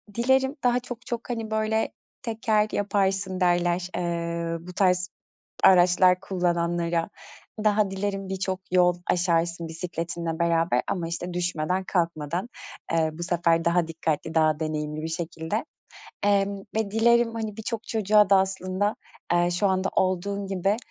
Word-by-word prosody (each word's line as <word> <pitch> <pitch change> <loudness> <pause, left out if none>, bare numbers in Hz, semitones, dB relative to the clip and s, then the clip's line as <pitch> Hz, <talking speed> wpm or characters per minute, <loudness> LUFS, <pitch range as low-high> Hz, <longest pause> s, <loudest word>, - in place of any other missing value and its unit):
Dilerim 265 +3 +2
daha 245 0 +3
çok 245 -1 -9
çok, 235 0 -5
hani, 225 -2 -3
böyle, 220 0 0 0.3
"Teker 220 -2 +1
yaparsın." 195 -2 0
derler, 175 0 +1
eee, 170 -1 -2
bu 180 - -8
tarz 180 -2 +2 0.5
araçlar 180 0 +6
kullananlara. 175 -1 0 0.5
Daha 210 -2 +2
dilerim 195 0 -3
birçok 190 0 -2
yol 180 -1 +4
aşarsın 170 -1 +1
bisikletinle 165 0 -4
beraber 165 -6 +2
ama, 170 -3 -2
işte, 175 +1 -4
düşmeden 180 +1 -1
kalkmadan, 170 +3 -2 0.4
eee, 160 -1 +2
bu 170 +2 -6
sefer 170 -1 +1
daha 170 -1 +2
dikkatli, 160 -1 -2
daha 155 -1 +3
deneyimli 155 -1 -3
bir 160 - -3
şekilde, 165 - -3 0.6
emm, 200 -1 +2 0.2
ve 220 -2 -1
dilerim, 235 +1 +3
hani, 220 -2 -4
birçok 225 +1 -4
çocuğa 210 -2 +3
da 195 - +7
aslında, 190 +2 0 0.4
eee, 175 0 +3
şu 180 +3 +1
anda 190 0 +1
olduğun 195 +2 0
gibi 195 +2 0
180 Hz, 135 wpm, -25 LUFS, 170-205 Hz, 0.6 s, da